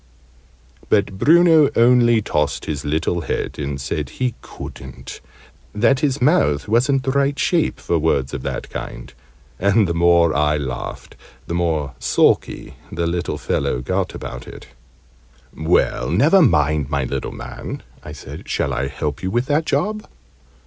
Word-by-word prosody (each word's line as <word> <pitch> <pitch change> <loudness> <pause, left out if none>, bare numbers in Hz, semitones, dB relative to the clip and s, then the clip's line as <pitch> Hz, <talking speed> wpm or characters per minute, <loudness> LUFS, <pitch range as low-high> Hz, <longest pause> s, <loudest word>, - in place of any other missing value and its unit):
But 100 -2 +1
Bruno 165 -1 +5
only 120 -2 +4
tossed 75 -6 -1
his 75 -3 -4
little 80 +3 -1
head, - - -3
and 70 -1 -3
said 70 +2 -3
he 125 -2 -2
couldn't; 65 -1 -10 0.5
that 120 +5 +3
his 140 -1 0
mouth 75 - +2
wasn't 130 +5 +2
the 135 - 0
right 140 +1 +1
shape 170 -3 +1
for 85 - 0
words 70 -3 0
of 70 - -4
that - - -5
kind. - - -7 0.5
And 100 +2 +3
the 85 - -1
more 85 -2 +3
I 75 +1 +2
laughed, 65 -4 -6 0.3
the - - -5
more 80 -6 -1
sulky - - +1
the 85 +1 -2
little 85 0 -2
fellow 60 - -1
got 95 +7 -2
about 65 0 -7
it. - - -11 0.9
"Well, 80 -1 +1
never 145 - +4
mind, 75 - +2
my 70 -2 0
little 65 - -3
man!" - - -8 0.2
I - - -8
said. - - -10
"Shall - - -1
I 65 - -1
help 75 0 -4
you 95 - -2
with 120 +5 0
that 150 +3 0
job?" 210 +9 -1
85 Hz, 150 wpm, -20 LUFS, -, 0.9 s, Bruno